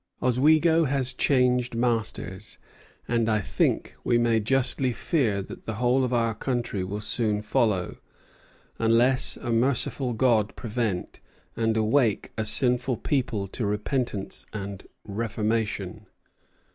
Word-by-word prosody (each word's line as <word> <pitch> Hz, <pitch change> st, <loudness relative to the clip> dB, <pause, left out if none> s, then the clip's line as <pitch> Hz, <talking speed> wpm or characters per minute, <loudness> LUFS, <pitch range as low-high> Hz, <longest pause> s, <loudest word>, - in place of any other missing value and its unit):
"Oswego 155 Hz, +6 st, +3 dB
has 130 Hz, -2 st, +1 dB
changed 125 Hz, -3 st, +2 dB
masters, 115 Hz, -2 st, -1 dB, 0.5 s
and 115 Hz, -1 st, +1 dB
I 110 Hz, -1 st, +2 dB
think 100 Hz, -, -1 dB
we 120 Hz, -, +2 dB
may 120 Hz, -1 st, +2 dB
justly 130 Hz, +3 st, +2 dB
fear 115 Hz, -, 0 dB
that -, -, -11 dB
the 110 Hz, -, -4 dB
whole 125 Hz, +3 st, +2 dB
of 125 Hz, -, -1 dB
our 115 Hz, -2 st, +1 dB
country 120 Hz, -4 st, -2 dB
will 100 Hz, +3 st, -4 dB
soon 105 Hz, -2 st, 0 dB
follow, 105 Hz, -6 st, 0 dB, 0.8 s
unless 120 Hz, +3 st, +3 dB
a 120 Hz, -, -4 dB
merciful 125 Hz, +1 st, +1 dB
God 110 Hz, -3 st, +2 dB
prevent, 110 Hz, -5 st, -3 dB, 0.4 s
and 115 Hz, -1 st, 0 dB
awake 110 Hz, 0 st, +1 dB
a 110 Hz, -, -2 dB
sinful 125 Hz, +2 st, +2 dB
people 125 Hz, -8 st, -1 dB
to 115 Hz, -, -4 dB
repentance 105 Hz, 0 st, -2 dB
and 100 Hz, -2 st, -6 dB, 0.2 s
reformation." 105 Hz, -2 st, -2 dB
115 Hz, 120 wpm, -26 LUFS, 105-125 Hz, 0.8 s, Oswego